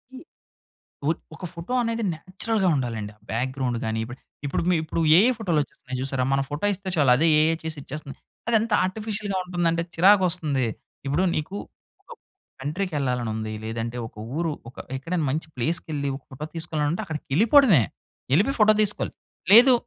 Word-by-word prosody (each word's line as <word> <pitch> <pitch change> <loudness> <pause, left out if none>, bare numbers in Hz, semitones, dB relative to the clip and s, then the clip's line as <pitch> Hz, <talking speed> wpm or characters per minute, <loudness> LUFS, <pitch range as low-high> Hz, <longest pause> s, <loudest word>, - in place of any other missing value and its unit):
ఈ - - -7 0.9
ఒద్ 165 - 0 0.2
ఒక 180 - -7
ఫోటో 170 +8 -6
అనేది 230 0 -1
నేచురల్‌గా 190 +4 -1
ఉండాలండి. 115 -6 -3
ఆ - - -38
బ్యాక్‌గ్రౌండ్ 130 +1 -1
గాని. 110 0 -1
ఇప్పు 120 +2 -8 0.3
ఇప్పుడు 140 - -1
మీ - - +4
ఇప్పుడు 165 +1 -2
ఏఐ 215 +9 +6
ఫోటోలు 180 -9 +1
వచ్చేస్తున్నాయి 130 -2 -7
చూసారా. 130 -1 -1
మన 135 - +2
ఫోటో 145 +6 -2
ఇస్తే 195 0 -6
చాలు 145 -6 +4
అదే 160 +6 +3
ఏఐ 160 +1 +3
చేసి 160 -1 -4
ఇచ్చేస్తుంది. 140 0 -8 0.3
అది 235 - +2
ఎంత 225 +1 -3
ఆర్టిఫిషియల్‌గా 205 0 -2
ఉంటుందంటే, 170 -2 0
చిరాకు 190 +3 +6
వస్తుంది. 150 -7 -1 0.4
ఇప్పుడు 145 +7 +1
నీకు 155 +6 -3 0.5
ఒక - - -33 0.5
కంట్రీకి 165 +6 -2
ఎళ్ళాలని 125 -4 -1
ఉంది, 110 0 -4
లేదంటే 115 +2 -4
ఒక - - -19 0.2
ఊరు 165 -1 0 0.2
ఒక 130 - -19 0.2
ఎక్కడైనా 165 +4 -2
మంచి 155 +3 -2
ప్లేస్‌కెళ్ళి, 145 +2 -1
ఒక 135 - -20
ఫోటో 135 +3 -6
తీసుకోవాలంటే 160 +2 -1
అక్కడికి 155 -4 -5
ఎళ్ళిపోవడమే. 220 - +6 0.5
ఎళ్ళిపోయి 235 - +2
ఫోటో 215 0 +6
తీసుకోవాలి, 210 -1 0 0.4
లేదు 250 +4 +9
160 Hz, 165 wpm, -25 LUFS, 135-195 Hz, 0.9 s, లేదు